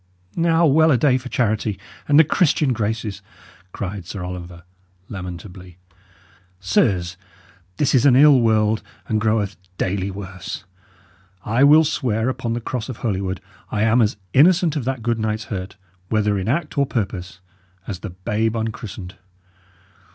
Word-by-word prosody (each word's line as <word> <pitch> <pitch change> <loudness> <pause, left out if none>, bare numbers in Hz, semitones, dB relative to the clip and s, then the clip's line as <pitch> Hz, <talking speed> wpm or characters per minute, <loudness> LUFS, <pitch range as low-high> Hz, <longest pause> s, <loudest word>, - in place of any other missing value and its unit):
"Now, 165 0 +3
well 160 +2 +5
a 135 - +4
day 130 +1 +3
for 125 0 -9
charity 110 -4 0 0.3
and 145 - +4
the 160 - +9
Christian 150 -4 +2
graces!" 110 -2 -3 0.5
cried 95 -2 -6
Sir 95 -4 -6
Oliver, 90 -1 -7 0.5
lamentably. 90 -1 -8 0.8
"Sirs, 95 -3 +1 0.6
this 145 - +1
is 130 - +4
an 135 -3 +6
ill 140 0 +7
world, 110 -1 +2 0.3
and 110 -1 0
groweth 110 -2 0 0.2
daily 95 +1 -1
worse. 95 0 -7 0.8
I 115 +5 +2
will 150 +3 +7
swear 120 -5 0
upon 120 -3 -3
the 120 - -3
cross 120 0 -4
of 125 - -6
Holywood 95 -3 -2 0.3
I 105 0 0
am 115 +2 +4
as 105 -2 +1 0.2
innocent 165 +2 +4
of 140 -6 -2
that 130 -3 -3
good 115 -1 0
knight's 110 0 -1
hurt, 95 +1 -6 0.3
whether 105 -2 +1
in 95 - -4
act 145 +3 -1
or 140 - +2
purpose, 95 -6 -4 0.5
as 95 -3 -5
the 105 - -6
babe 105 +5 -2
unchristened. 105 -4 -5
110 Hz, 150 wpm, -21 LUFS, 95-130 Hz, 0.8 s, the